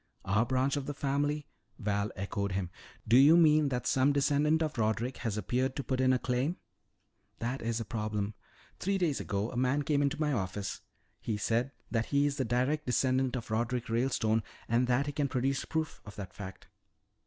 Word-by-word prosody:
"Our 105 +5 +2
branch 130 +2 +1
of 140 - -4
the 145 - -3
family?" 145 +2 0 0.3
Val 100 -1 -1
echoed 100 0 -2
him. 95 -2 -2 0.4
"Do 115 +3 +6
you 145 +5 +8
mean 155 -3 +5
that 125 -2 -2
some 135 +2 +3
descendant 145 +3 +2
of 150 -5 -3
Roderick 110 +3 0
has 110 -3 -3
appeared 125 +6 0
to 140 - -3
put 130 -1 -1
in 130 0 +4
a 130 - +4
claim?" 130 +7 -1 0.8
"That 120 +4 -3
is 115 0 -1
the 115 - -3
problem. 105 -1 -2 0.5
Three 195 +1 0
days 170 -7 +1
ago 100 +2 -2
a - - -8
man 130 +3 +2
came 145 -2 +2
to 140 - -6
my 150 -2 +1
office. 100 -2 -3 0.4
He 110 - -2
said 115 +5 0 0.2
that 115 -1 0
he 140 0 +2
is 145 -1 -1
the 130 - 0
direct 130 +6 0
descendant 130 +1 +1
of 120 -3 -5
Roderick 120 +2 -1
Ralestone 115 -2 +1 0.3
and 120 +2 +2
that 125 +3 +2
he 145 - -2
can 145 0 0
produce 135 +1 0
proof 160 -1 -3
of 105 - -11
that 100 -3 -7
fact." 95 -1 -9
125 Hz, 195 wpm, -31 LUFS, 110-140 Hz, 0.8 s, you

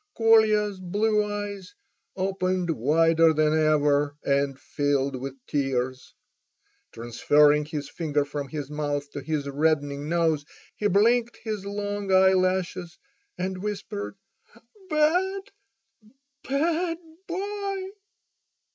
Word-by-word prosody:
Kolya's 215 -3 +4
blue 210 +4 +1
eyes 205 - -5 0.4
opened 185 -2 -1
wider 165 +4 +3
than 155 0 +2
ever, 145 -2 +2
and 140 -1 0
filled 140 -2 -1
with 135 +1 -6
tears. 130 -3 -2 0.8
Transferring 145 +6 +3
his 150 -2 -5
finger 150 -4 -1
from 145 -1 -5
his 145 0 -6
mouth 145 -1 -3
to 145 - -6
his 145 0 -2
reddening 145 0 0
nose 165 -3 +1 0.3
he 210 - 0
blinked 230 +4 +2
his 210 -3 -4
long 205 -1 -3
eyelashes 185 -2 +2 0.4
and 185 0 -3
whispered: 205 0 -5 0.7
"Bad—bad 320 - -2 0.3
boy!" 395 +1 -3
180 Hz, 95 wpm, -26 LUFS, 145-210 Hz, 0.8 s, Kolya's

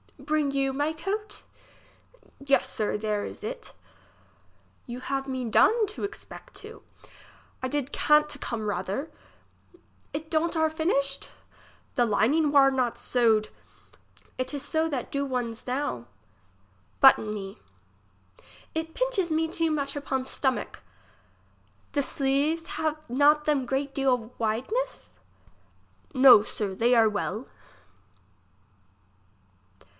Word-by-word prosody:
Bring 295 0 0
you 275 -1 0
my 290 +3 0
coat? 395 +7 -4 1.0
Yes, 275 -1 +2
sir, 215 -4 -1
there 210 -1 -1
is - - -9
it 485 +3 -6 1.1
You 245 0 -6
have 270 +1 -3
me 260 -2 -3
done 435 - +4
to 415 - -7
expect 405 +1 -8
too. - - -9 0.8
I 255 - -1
did 285 0 -2
can't 300 0 +4
to - - -1
come 220 -3 -3
rather. 205 - -3 1.0
It 315 +2 -5
don't 330 +1 +1
are 315 -1 +3
finished? 280 -4 -1 0.7
The 245 - +3
lining 280 +8 +2
war 275 -2 +6
not 255 -3 0
scwd. 225 -4 +2 0.9
It 255 +1 -3
is 285 - -4
so 320 0 0
that 270 -5 -4
do 280 0 -1
one's 245 -3 -4
now. 250 - -2 0.9
Button 265 -5 +6
me. 195 -2 -7 1.1
It 320 0 -4
pinches - - 0
me 320 +1 +1
too 330 0 0
much 280 -2 -2
upon 265 -2 -2
stomack. 265 0 -2 1.1
The 285 - +1
sleeves 280 +5 0
have 310 -1 0
not 290 +4 +4
them 290 -4 +1
great 275 +2 -1
deal 250 -4 0
wideness? 260 - -2 1.0
No, 255 -5 +8
sir, 205 -2 -4
they 235 +5 +3
are 225 -2 +5
well. 210 +3 -3
275 Hz, 120 wpm, -27 LUFS, 245-310 Hz, 1.1 s, No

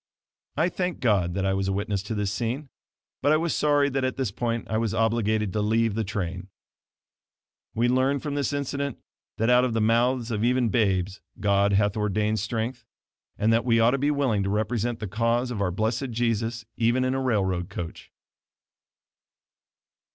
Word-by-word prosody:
I 165 +4 +3
thank 180 -1 -3
God 95 -7 +1
that 95 0 0
I 95 - +2
was 95 0 -1
a - - +1
witness 100 0 -1
to 105 +3 -5
this 105 -2 -1
scene, 120 +7 -3 0.5
but 145 - +3
I 155 - +5
was 165 +1 -1
sorry 145 -1 +3
that 135 -1 -1
at 130 0 -1
this 130 -7 -1
point 115 +2 -2
I 110 - 0
was 115 -2 -1
obliged 110 -3 +1
to 105 - 0
leave 110 +1 +2
the 110 +2 -1
train. 95 -1 -4 1.3
We 120 +2 +2
learn 130 +3 +2
from 145 +1 -4
this 145 -2 -1
incident 140 -1 -2 0.4
that 115 +3 +2
out 125 0 +5
of 125 -3 0
the 115 - +1
mouths 120 +2 +2
of 105 -1 -1
even 125 0 +2
babes 100 -3 0 0.2
God 100 0 +2
hath 100 0 +2
ordained 105 +1 0
strength, 115 +3 -3 0.5
and 110 +2 +2
that 115 - +2
we 115 -1 +3
ought 115 +1 +5
to 140 - 0
be 145 +2 +1
willing 135 -8 +1
to 100 - -1
represent 110 +3 -1
the - - -4
cause 115 +4 0
of 105 -4 -3
our 95 - +1
blessed 110 +7 -1
Jesus 115 0 -1
even 120 +2 +2
in 130 - +1
a 135 - -1
railroad 95 -8 0
coach. 85 -4 -7
115 Hz, 190 wpm, -26 LUFS, 105-125 Hz, 1.3 s, I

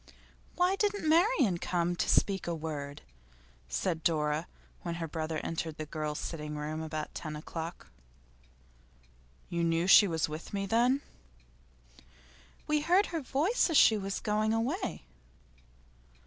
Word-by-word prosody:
'Why 360 +2 +3
didn't 410 -5 0
Marian 315 - +3
come 175 0 0
to - - 0
speak 195 -3 +2
a 170 - -1
word?' 150 -2 -5 0.7
said 155 - -1
Dora, 155 0 +1 0.3
when 170 -1 -4
her 165 -1 -4
brother 160 0 -3
entered 160 -1 -3
the 155 - -4
girls' 150 -1 -4
sitting 150 -2 -5
room 155 +1 -4
about 155 -1 -5
ten 155 -2 -5
o'clock. 165 +2 -6 1.6
'You 170 -2 -2
knew 165 +1 +1
she 200 +2 +8
was 160 -3 0
with 155 +6 -7
me, 195 0 -1
then?' 240 +6 +2 1.6
'We 300 0 +1
heard 360 +6 +4
her 325 - -1
voice 310 - +1
as 325 - +3
she 220 - +7
was 195 -2 -3
going 215 +1 +1
away. 255 - -2
170 Hz, 135 wpm, -31 LUFS, 155-250 Hz, 1.6 s, she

